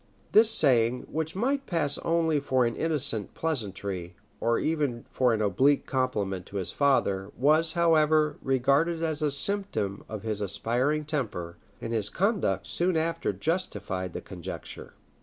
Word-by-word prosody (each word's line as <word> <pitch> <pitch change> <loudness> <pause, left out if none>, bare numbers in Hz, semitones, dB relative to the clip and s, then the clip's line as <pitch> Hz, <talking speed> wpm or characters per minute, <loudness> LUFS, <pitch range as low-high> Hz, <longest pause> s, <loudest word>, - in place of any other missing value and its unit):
This 220 +1 +6
saying, 125 - +3
which 160 +2 -3
might 270 +7 -1
pass 150 -5 -1
only 165 -2 +1
for 130 -3 +1
an 115 - -1
innocent 145 -10 0
pleasantry, 100 - -3 0.2
or 115 0 +1
even 145 -7 -1
for 125 -2 +2
an 110 -1 0
oblique 130 +9 +2
compliment 105 -9 -2
to - - -12
his 95 -3 -2
father, 100 -9 +1
was, 155 +5 +3
however, 155 -3 +3
regarded 140 +6 +1
as 160 -1 0
a 150 - +2
symptom 140 - +1
of 110 -2 -6
his 110 -2 -3
aspiring 120 +10 0
temper; 105 - -4 0.2
and 115 - -5
his 105 -3 +1
conduct 190 - 0
soon 175 -1 0
after 165 +1 -1
justified 105 - -3
the - - -5
conjecture. 90 -3 -8
140 Hz, 145 wpm, -27 LUFS, 105-160 Hz, 0.2 s, This